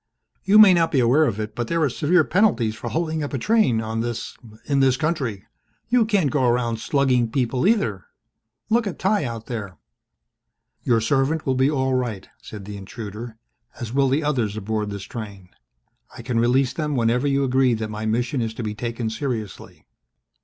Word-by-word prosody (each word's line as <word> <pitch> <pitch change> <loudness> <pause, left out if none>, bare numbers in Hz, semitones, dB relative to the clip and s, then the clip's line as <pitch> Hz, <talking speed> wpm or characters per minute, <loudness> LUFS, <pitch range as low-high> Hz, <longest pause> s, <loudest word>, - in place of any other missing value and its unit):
"You 200 +2 +4
may 210 -3 +9
not 165 -2 +2
be 135 - +2
aware 130 +6 +4
of 110 -6 -2
it 105 0 -4
but 120 -1 -3
there 165 -1 0
are - - +4
severe 150 +7 +2
penalties 150 - +2
for 115 +4 -6
holding 160 -1 -2
up 145 - -4
a - - 0
train 185 - +2
on 110 0 -3
this 120 0 -4 0.3
in 140 -1 +1
this 135 -1 +3
country. 135 - -2 0.4
You 240 -2 +3
can't 200 - +1
go 145 -3 +1
around 120 -2 +1
slugging 130 -3 +1
people 125 +5 0
either. 110 - +1 0.6
Look 225 +1 +1
at 195 - -5
Ty 195 -4 +1
out 115 -2 -6
there." 100 -8 -6 1.0
"Your 115 -2 +2
servant 135 +6 0
will 130 - +1
be 130 +2 +2
all 130 -3 0
right," 120 -6 -2
said 105 -3 -9
the 105 0 -7
intruder, 110 +3 -8 0.4
"as 120 -1 -6
will 135 0 +2
the 145 +4 +1
others 120 -8 -1
aboard 105 0 -2
this 100 -1 -6
train. 100 -7 -8 0.7
I - - -9
can 120 -3 -1
release 125 +2 +2
them 150 -2 -2
whenever 120 +3 +1
you 140 0 +1
agree 130 -2 +2
that 110 -1 -4
my 110 +1 -4
mission 120 +4 0
is 110 -1 -3
to 120 - -5
be 105 -1 -3
taken 115 +1 -4
seriously." 110 - -5
125 Hz, 190 wpm, -22 LUFS, 110-145 Hz, 1.0 s, may